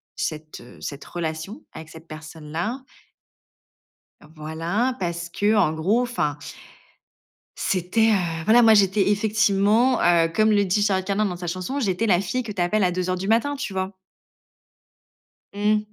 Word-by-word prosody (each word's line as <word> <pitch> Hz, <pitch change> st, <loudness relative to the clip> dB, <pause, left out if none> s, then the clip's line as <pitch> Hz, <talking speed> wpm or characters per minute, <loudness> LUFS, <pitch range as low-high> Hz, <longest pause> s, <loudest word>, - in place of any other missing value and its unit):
cette, 155 Hz, 0 st, -5 dB
heu, 120 Hz, -, -15 dB
cette 140 Hz, -1 st, -7 dB
relation 160 Hz, +4 st, -5 dB
avec 160 Hz, 0 st, -10 dB
cette 160 Hz, +1 st, -14 dB
personne 155 Hz, -1 st, -10 dB
là. 215 Hz, +12 st, -3 dB, 1.5 s
Voilà, 165 Hz, +11 st, -2 dB
parce 170 Hz, -1 st, -3 dB
que, 205 Hz, +5 st, +1 dB
en 175 Hz, -7 st, +3 dB
gros, 195 Hz, +10 st, +1 dB
enfin 150 Hz, -12 st, -2 dB, 1.2 s
c'était, 195 Hz, +5 st, +1 dB
heu, 170 Hz, -5 st, -1 dB
voilà, 235 Hz, +3 st, +6 dB
moi, 225 Hz, -2 st, +6 dB
j'étais, 200 Hz, 0 st, +3 dB
effectivement, 215 Hz, +3 st, +2 dB
heu, 170 Hz, -1 st, +4 dB
comme 215 Hz, +2 st, +3 dB
le 205 Hz, -1 st, +3 dB
dit 200 Hz, +2 st, +1 dB
Charles 190 Hz, -2 st, +1 dB
Carnan 200 Hz, +2 st, 0 dB
dans 185 Hz, -3 st, -2 dB
sa 175 Hz, 0 st, -7 dB
chanson, 185 Hz, +11 st, -3 dB
j'étais 205 Hz, -2 st, 0 dB
la 185 Hz, -4 st, +3 dB
fille 250 Hz, +7 st, -2 dB
que 220 Hz, -, -6 dB
tu 190 Hz, -, -3 dB
appelles 200 Hz, +4 st, +1 dB
à 180 Hz, -, +2 dB
2:00 185 Hz, 0 st, -1 dB
du 195 Hz, -, -4 dB
matin, 235 Hz, +7 st, +2 dB
tu 275 Hz, -8 st, -5 dB
vois? 190 Hz, +1 st, -3 dB, 1.6 s
Mmh, 210 Hz, +1 st, +2 dB
190 Hz, 160 wpm, -23 LUFS, 170-215 Hz, 1.6 s, voilà